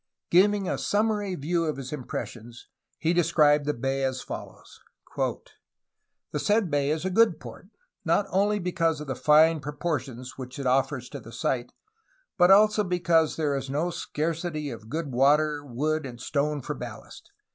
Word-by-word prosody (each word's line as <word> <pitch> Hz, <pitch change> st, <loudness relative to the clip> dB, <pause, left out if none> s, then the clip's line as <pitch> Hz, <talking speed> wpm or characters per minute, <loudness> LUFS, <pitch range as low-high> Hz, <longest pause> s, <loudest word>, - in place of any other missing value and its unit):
'' -, -, -56 dB
Giving 200 Hz, +2 st, +4 dB
a -, -, -1 dB
summary 205 Hz, -2 st, 0 dB
view 165 Hz, +3 st, -1 dB
of 155 Hz, -3 st, -2 dB
his 135 Hz, +1 st, -6 dB
impressions, 120 Hz, -3 st, -7 dB, 0.3 s
he 165 Hz, +1 st, +1 dB
described 150 Hz, -4 st, +3 dB
the 150 Hz, -, +1 dB
bay 135 Hz, +3 st, -1 dB
as 130 Hz, -1 st, -2 dB
follows: -, -, -9 dB, 0.4 s
"The 150 Hz, -, -7 dB
said 210 Hz, -3 st, +1 dB
bay 145 Hz, -1 st, +1 dB
is 155 Hz, +3 st, -1 dB
a 190 Hz, -, -1 dB
good 230 Hz, +4 st, +4 dB
port, -, -, -11 dB, 0.4 s
not 205 Hz, -, +2 dB
only 205 Hz, +2 st, +2 dB
because 170 Hz, -4 st, 0 dB
of 150 Hz, -, -6 dB
the 135 Hz, -, -3 dB
fine 155 Hz, +3 st, +4 dB
propor 150 Hz, +2 st, -2 dB
tions 125 Hz, +1 st, -10 dB
which 125 Hz, 0 st, -7 dB
it 140 Hz, -, -5 dB
offers 130 Hz, 0 st, +1 dB
to 140 Hz, -, -7 dB
the 115 Hz, -1 st, -12 dB
sight, 120 Hz, +1 st, -2 dB, 0.6 s
but 175 Hz, 0 st, +5 dB
also 210 Hz, +2 st, +6 dB
because 170 Hz, -3 st, +2 dB
there 150 Hz, -3 st, 0 dB
is 135 Hz, -1 st, -4 dB
no 155 Hz, +6 st, -1 dB
scar 165 Hz, 0 st, -2 dB
city 155 Hz, -3 st, -4 dB
of 110 Hz, -1 st, -10 dB
good 155 Hz, 0 st, -3 dB
water, 145 Hz, +3 st, +3 dB
wood, 145 Hz, +3 st, -2 dB
and 120 Hz, -2 st, -10 dB
stone 145 Hz, +3 st, -1 dB
for -, -, -4 dB
ballast. -, -, -10 dB
150 Hz, 175 wpm, -26 LUFS, 135-175 Hz, 0.6 s, also